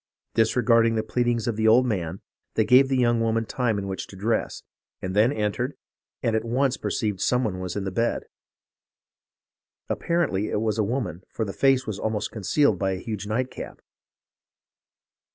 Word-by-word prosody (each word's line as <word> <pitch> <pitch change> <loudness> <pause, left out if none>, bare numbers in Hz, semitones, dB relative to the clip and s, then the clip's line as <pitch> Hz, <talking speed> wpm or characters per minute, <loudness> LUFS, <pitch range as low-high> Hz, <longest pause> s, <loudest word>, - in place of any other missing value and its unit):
Disregarding 115 0 +3
the 110 - 0
pleadings 120 0 0
of 115 -3 -1
the 110 0 +2
old 120 +4 +6
man, 95 -6 -2 0.3
they 110 - +3
gave 130 +3 +6
the 135 - +1
young 120 -2 +3
woman 115 0 +1
time 115 -1 0
in 100 - -3
which 95 -1 -4
to - - -12
dress, 110 +4 -1 0.4
and 95 +1 -4
then 110 +5 +4
entered, 105 -7 -2 0.5
and 115 - +1
at 110 - 0
once 130 +3 +1
perceived 105 -4 -2
some 125 0 +2
one 95 -5 -2
in 100 - -2
the 95 - -3
bed. 115 +5 0 1.7
Apparently 160 - 0
it - - 0
was 110 0 -1
a - - +3
woman, 100 - -2
for 110 - -3
the 100 - -5
face 135 -1 +3
was 105 -2 -4
almost 110 -1 -2
concealed 130 +7 +2
by 95 -1 0
a - - -3
huge 105 0 -5
nightcap. 125 +4 -3
110 Hz, 170 wpm, -25 LUFS, 105-125 Hz, 1.7 s, old